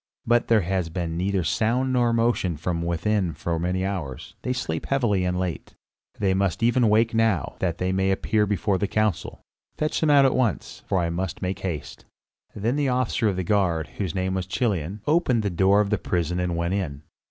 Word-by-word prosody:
"But 120 +1 +2
there 115 -2 +4
has 90 -1 -1
been 80 -1 -3
neither 95 +1 0
sound 125 - +1
nor 120 -2 +3
motion 115 -8 +1
from 85 +2 -2
within 85 +1 0
for 85 +1 -2
many 90 +2 -1
hours; 85 -10 -5
they 125 - -2
sleep 80 -11 -3
heavily 120 -9 +1
and 90 0 0
late." 90 -3 -4 0.4
"They 100 -2 +1
must 95 +1 0
even 120 +1 +3
awake 110 +2 +3
now, 110 -9 +1
that 85 -3 -1
they 90 +1 -1
may 95 +1 +1
appear 105 +2 +1
before 100 -1 0
the 100 - 0
council. 105 -3 -1 0.4
Fetch 155 0 0
them 160 - +2
out 140 -2 +6
at 135 - +3
once, 120 -8 -1
for 95 - +1
I 85 -2 0
must 90 +1 -4
make 95 +1 -2
haste." 85 -7 -5 0.5
Then 115 +7 -1
the 145 -2 +1
officer 125 -3 +1
of 95 - -2
the 95 - -2
guard, 85 -5 +1
whose 95 -6 -2
name 95 0 -1
was 95 -2 -2
Chilion, 95 -2 -1
opened 145 -8 +2
the 100 - -1
door 95 +4 +4
of 100 0 -2
the 105 - +1
prison 90 0 -1
and 90 -1 -1
went 85 +2 -1
in. 75 -7 -3
95 Hz, 205 wpm, -24 LUFS, 90-115 Hz, 0.5 s, out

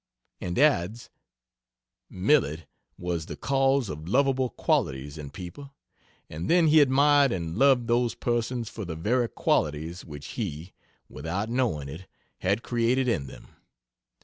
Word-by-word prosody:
And 90 0 -4
adds: 115 - +2 1.0
"Millet 90 - +1 0.3
was 85 -3 -3
the - - -6
cause 135 -2 +1
of 75 -1 -7
lovable 130 +1 +2
qualities 70 - -1
in 75 -3 -7
people, 135 - -10 0.5
and 80 +3 -5
then 170 -2 +5
he 155 +1 +7
admired 140 0 +4
and 85 -3 -3
loved 130 0 +4
those 120 0 +1
persons 120 0 -1
for 110 - -7
the 85 -4 -5
very 115 +8 0
qualities 80 +4 -1
which 75 -2 -9
he 90 -6 -5 0.3
(without 90 +10 -4
knowing 120 - 0
it) 80 +7 -9 0.3
had 100 +5 0
created 120 +2 +1
in 75 - 0
them. - - -13
110 Hz, 135 wpm, -27 LUFS, 80-130 Hz, 1.0 s, he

